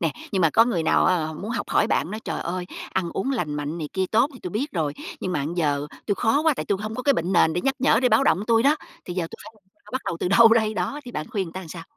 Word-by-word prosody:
nè, 165 Hz, -4 st, 0 dB, 0.2 s
nhưng 190 Hz, -2 st, +1 dB
mà 165 Hz, -, +4 dB
có 225 Hz, -, +5 dB
người 200 Hz, -9 st, 0 dB
nào 160 Hz, -, +3 dB
á, 175 Hz, -4 st, +2 dB
họ 160 Hz, -, -5 dB
muốn 205 Hz, +8 st, -6 dB
học 230 Hz, -3 st, -3 dB
hỏi 210 Hz, -, +3 dB
bạn, 185 Hz, -, 0 dB
nói: 215 Hz, -, -5 dB
"Trời -, -, -3 dB
ơi! 180 Hz, +1 st, -3 dB, 0.3 s
Ăn 170 Hz, -2 st, -1 dB
uống 260 Hz, -, -2 dB
lành 175 Hz, -, -2 dB
mạnh 150 Hz, +3 st, -4 dB
này 155 Hz, -3 st, -4 dB
kia 190 Hz, -1 st, 0 dB
tốt 235 Hz, +6 st, +3 dB
thì 255 Hz, -, -12 dB
tui 180 Hz, -, -5 dB
biết 260 Hz, -, -3 dB
rồi, 155 Hz, -5 st, -1 dB, 0.3 s
nhưng 185 Hz, -, -2 dB
mà 145 Hz, -5 st, -1 dB
giờ 145 Hz, -3 st, 0 dB, 0.2 s
tui 205 Hz, -, +1 dB
khó 225 Hz, +7 st, +2 dB
quá, 320 Hz, -1 st, +4 dB
tại -, -, -3 dB
tui 200 Hz, -, 0 dB
hổng 215 Hz, +2 st, -5 dB
có 250 Hz, -, -4 dB
cái 280 Hz, +2 st, +4 dB
bệnh 175 Hz, -3 st, -1 dB
nền 160 Hz, -3 st, +4 dB
để 175 Hz, -, -1 dB
nhắc 270 Hz, +5 st, 0 dB
nhở 250 Hz, -3 st, +3 dB
để 250 Hz, -, +4 dB
báo 275 Hz, -, +4 dB
động 195 Hz, -, +3 dB
tui 230 Hz, -1 st, +4 dB
đó, 290 Hz, +3 st, +4 dB, 0.3 s
thì 175 Hz, -, -6 dB
giờ 180 Hz, -, -1 dB
tui -, -, -9 dB
phải -, -, -11 dB
làm 210 Hz, -, -27 dB, 0.2 s
sao, -, -, -17 dB
bắt 260 Hz, -, -1 dB
đầu 170 Hz, -, -2 dB
từ -, -, 0 dB
đâu 225 Hz, +4 st, +7 dB
đây?". 220 Hz, -1 st, +3 dB
Đó, 290 Hz, +6 st, -2 dB
thì 245 Hz, -, -8 dB
bạn 150 Hz, -, -4 dB
khuyên 205 Hz, -5 st, -1 dB
người 165 Hz, -, -10 dB
ta 190 Hz, 0 st, -6 dB
sao? 165 Hz, +1 st, -7 dB
195 Hz, 325 wpm, -24 LUFS, 170-230 Hz, 0.3 s, đâu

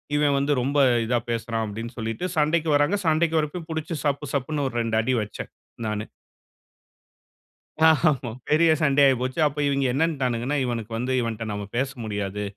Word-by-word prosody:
"இவன் 145 Hz, -1 st, +3 dB
வந்து 140 Hz, +1 st, +1 dB
ரொம்ப 140 Hz, +3 st, 0 dB, 0.3 s
இதா 120 Hz, +1 st, +1 dB
பேசுறான்" 115 Hz, 0 st, -2 dB
அப்படின்னு 115 Hz, +4 st, -6 dB
சொல்லிட்டு 115 Hz, +7 st, -3 dB
சண்டைக்கு 155 Hz, +2 st, +2 dB
வர்றாங்க. 145 Hz, +8 st, +3 dB
சண்டைக்கு 160 Hz, +1 st, +2 dB
வர்றப்பயும் 155 Hz, +2 st, -4 dB
புடிச்சு 160 Hz, +1 st, -3 dB
சப்பு, 145 Hz, +1 st, 0 dB
சப்புனு 140 Hz, +1 st, -1 dB
ஒரு 120 Hz, -, -7 dB
2 115 Hz, -1 st, 0 dB
அடி 130 Hz, +3 st, 0 dB
வச்சேன், 105 Hz, -, -7 dB, 0.4 s
நானு. 105 Hz, 0 st, -2 dB, 1.8 s
ஆமா. 150 Hz, -6 st, +2 dB, 0.2 s
பெரிய 160 Hz, +2 st, +5 dB
சண்டை 140 Hz, -1 st, +4 dB
ஆயிப்போச்சு. 130 Hz, +2 st, 0 dB
அப்ப 150 Hz, 0 st, -3 dB
இவைங்க 140 Hz, -1 st, +1 dB
என்னன்ட்டானுங்கன்னா, 135 Hz, -3 st, 0 dB
"இவனுக்கு 115 Hz, -3 st, -3 dB
வந்து 125 Hz, +3 st, -2 dB
இவன்ட்ட 115 Hz, -1 st, -3 dB
நாம 100 Hz, 0 st, -4 dB
பேச 135 Hz, +2 st, 0 dB
முடியாது. 105 Hz, -1 st, -3 dB
135 Hz, 155 wpm, -24 LUFS, 115-150 Hz, 1.8 s, பெரிய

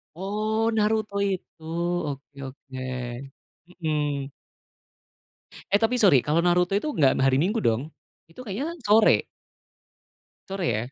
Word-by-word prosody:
Oh, 215 Hz, +4 st, -1 dB
Naruto 215 Hz, -1 st, +1 dB, 0.2 s
itu, 175 Hz, -3 st, -7 dB, 0.5 s
oke 140 Hz, +1 st, -9 dB
oke, 135 Hz, +1 st, -14 dB, 1.0 s
mhm. 150 Hz, -5 st, -2 dB, 1.4 s
Eh, 200 Hz, -, +4 dB
tapi 230 Hz, +3 st, +2 dB
sorry, 195 Hz, -, +6 dB
kalau 155 Hz, +6 st, +1 dB
Naruto 180 Hz, +2 st, +2 dB
itu 300 Hz, +10 st, 0 dB
nggak 140 Hz, -, +3 dB
hari 135 Hz, 0 st, +3 dB
Minggu 205 Hz, +8 st, 0 dB
dong? 125 Hz, +8 st, 0 dB, 0.3 s
Itu 165 Hz, +10 st, -11 dB
kayaknya 260 Hz, -, -4 dB
sore. 215 Hz, +1 st, +5 dB, 1.3 s
Sore 195 Hz, -2 st, -3 dB
ya? 115 Hz, +4 st, -3 dB
180 Hz, 115 wpm, -25 LUFS, 145-215 Hz, 1.4 s, sorry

